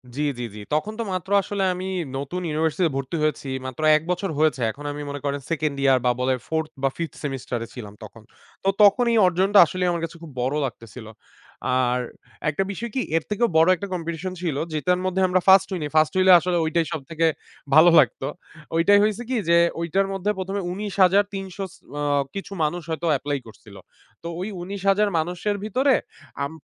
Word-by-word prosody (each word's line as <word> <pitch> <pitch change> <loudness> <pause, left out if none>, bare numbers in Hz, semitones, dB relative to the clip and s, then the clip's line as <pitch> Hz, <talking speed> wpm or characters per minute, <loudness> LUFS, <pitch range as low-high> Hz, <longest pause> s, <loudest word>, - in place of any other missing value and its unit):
জি, 150 - -2 0.2
জি, - - -3
জি, 105 - -8
তখন 205 +8 0
তো 230 - 0
মাত্র 185 +1 -4
আসলে 195 +1 -3
আমি 185 +1 -5 0.3
নতুন 145 +7 -4
ইউনিভার্সিটিতে 160 +2 0
ভর্তি 135 +4 -4
হয়েছি। 155 -2 -1 0.2
মাত্র 130 +4 -6 0.2
১ 155 - -6
বছর 180 +1 -2
হয়েছে 155 -5 +2
এখন 145 +4 -11
আমি 145 0 -6
মনে 145 - -5
করেন 140 0 -1
2nd 155 -3 -1
ইয়ার 135 -2 +5
বা 125 - +4
বলে 130 +1 +1
4th 160 -1 -1
বা 135 - +4
5th 165 -2 -4
সেমেস্টারে 125 -4 -4
ছিলাম 105 -5 -9
তখন। 110 +1 -12 0.4
তো 195 - +2
তখন 205 +5 +5
এই 230 - +3
অর্জনটা 190 +3 +4
আসলেই 180 +2 -2
আমার 170 -1 -2
কাছে 165 +1 -10
খুব 155 - -10
বড় 130 +4 0
লাগতেছিল। 115 -1 -8 0.7
আর 125 -1 +1 0.5
একটা 150 +6 0
বিষয় 235 +5 -5
কি 260 - +1 0.2
এর 165 - -1
থেকেও 220 +3 +1
বড় 165 +3 +5
একটা 200 +3 -6
কম্পিটিশন 170 +1 -4
ছিল 165 -6 -1 0.2
যেটার 180 +4 +1
মধ্যে 185 0 0
আমরা 185 0 +2
1st 190 0 +7
হইনি, 160 -5 -2
1st 155 0 +4
হইলে 185 0 +6
আসলে 175 0 -1
ওইটাই 165 +1 +1
সবথেকে 160 +3 -1 0.5
ভালো 160 +3 +8
লাগত। - - +2 0.5
ওইটাই 200 +5 +5
হইছে 215 +2 0
কি 260 - 0
যে 170 - +6 0.2
ওইটার 195 +4 0
মধ্যে 195 +2 -2
১ম 190 +1 -4
এ - - -2
১৯৩০০ 195 -1 +1 0.2
স - - -17 0.3
আ - - -2 0.3
কিছু 195 0 -6
মানুষ 170 +3 -1
হয়তো 165 +1 -2
এপ্লাই 145 +1 -2
করছিল। 105 -1 -15 0.5
তো - - -5
ওই 185 - -3
১৯০০০ 195 +2 +1
মানুষের 180 +5 -1
ভিতরে 255 +6 +2 0.5
আম 140 - -7
170 Hz, 190 wpm, -23 LUFS, 145-195 Hz, 0.7 s, ভালো